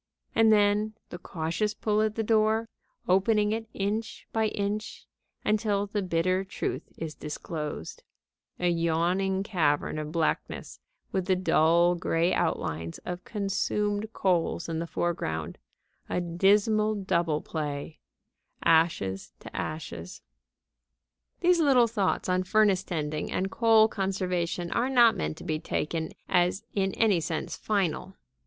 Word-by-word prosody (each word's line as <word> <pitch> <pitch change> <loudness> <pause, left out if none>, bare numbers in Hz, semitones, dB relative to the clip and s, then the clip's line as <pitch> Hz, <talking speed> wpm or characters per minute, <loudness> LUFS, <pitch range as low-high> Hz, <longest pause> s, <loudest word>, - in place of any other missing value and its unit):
And 225 -1 +5
then 210 +1 +3 0.2
the 175 - -6
cautious 175 +6 -2
pull 215 -1 +1
at 215 -1 0
the 225 - -1
door, 220 +1 +2 0.4
opening 210 +3 +3
it 225 +1 -3
inch 210 +3 -3
by 220 -1 +2
inch, 210 +1 -3 0.4
until 210 -1 +1
the 205 0 -2
bitter 185 +1 +1
truth 190 - -4
is 160 -2 -5
disclosed 150 - -6 0.6
a 180 - +1
yawning 175 +3 +1
cavern 155 -7 0
of 155 0 -5
blackness 165 -1 -2 0.3
with 190 -2 -1
the 190 - +3
dull, 170 -1 +4
gray 170 0 +1
outlines 80 +1 -1
of 180 0 -5
consumed 205 +1 -1
coals 175 -5 0
in 165 -1 -2
the 170 - -3
foreground, 80 - -2 0.5
a - - 0
dismal 205 +5 +2
double 170 -6 0
play: 150 -1 -5 0.6
ashes 160 - +2
to - - -11
ashes. 150 - -5 1.2
These 355 0 +4
little 270 -6 +5
thoughts 215 -4 0
on 185 0 +2
furnace 195 0 +3
tending 155 -5 -3
and 190 +1 -1
coal 225 -2 +5
conservation 180 -4 -2
are 245 +2 +1
not 240 -4 +6
meant 75 0 -3
to - - -10
be 155 -1 -2
taken 160 0 -2 0.2
as 180 +1 +2
in 195 -1 0
any 210 -6 +3
sense 160 0 -3
final. 190 -2 -1
185 Hz, 130 wpm, -28 LUFS, 165-210 Hz, 1.2 s, not